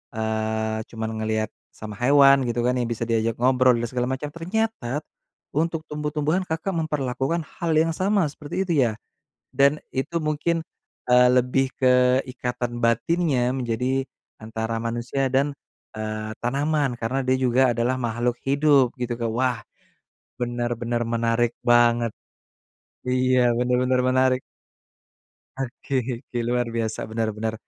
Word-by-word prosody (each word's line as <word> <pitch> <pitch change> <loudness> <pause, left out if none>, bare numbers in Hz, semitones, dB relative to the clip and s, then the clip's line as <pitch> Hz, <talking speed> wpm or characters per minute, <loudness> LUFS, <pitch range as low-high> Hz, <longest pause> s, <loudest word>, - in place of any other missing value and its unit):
eee, 110 0 -1
cuma 110 -1 -5
ngelihat 110 0 -2 0.2
sama 105 -1 -9
hewan 140 +1 +6
gitu 120 0 -1
kan 125 - +2
yang 120 -2 -1
bisa 115 0 -2
diajak 115 0 0
ngobrol 130 0 +4
dan 120 0 -2
segala 125 +1 -2
macam, 130 +3 -3
ternyata, 170 - -2 0.5
untuk 165 +2 0
tumbuh-tumbuhan 150 +3 -1
Kakak 160 +4 -2
memperlakukan 150 -1 -1 0.2
hal 170 -1 +1
yang 165 +1 +3
sama 195 +1 +1
seperti 150 +6 -4
itu 175 - 0 0.2
ya, - - -4 0.6
dan 140 +2 +4
itu 165 +6 -2
mungkin, 155 +2 0 0.5
eee, 125 0 +6
lebih 130 +1 +2
ke 125 0 +4
ikatan 125 -1 -4
batinnya 125 +1 +1
menjadi 125 +2 -1 0.3
antara 110 +1 -4
manusia 120 +4 -2
dan, 140 +2 +1 0.4
eee, 110 0 -4
tanaman 140 +2 +1
karena 130 +4 -1
dia 130 0 +2
juga 130 0 +3
adalah 120 +2 0
makhluk 120 0 -1
hidup 140 -2 +4
gitu. 120 -1 -2 0.2
Wah, 125 -2 0 0.8
benar-benar 120 -1 -2
menarik 115 0 +1
banget. 120 -1 +4 1.0
Iya, 130 0 +3 0.2
benar-benar 125 +1 +2
menarik. 130 0 +3 1.2
Oke 135 +1 -6 0.3
oke, 125 - -7
luar 120 0 +1
biasa, 110 -1 -2
benar 110 0 0
benar. 110 +1 -2
125 Hz, 130 wpm, -24 LUFS, 115-140 Hz, 1.2 s, hewan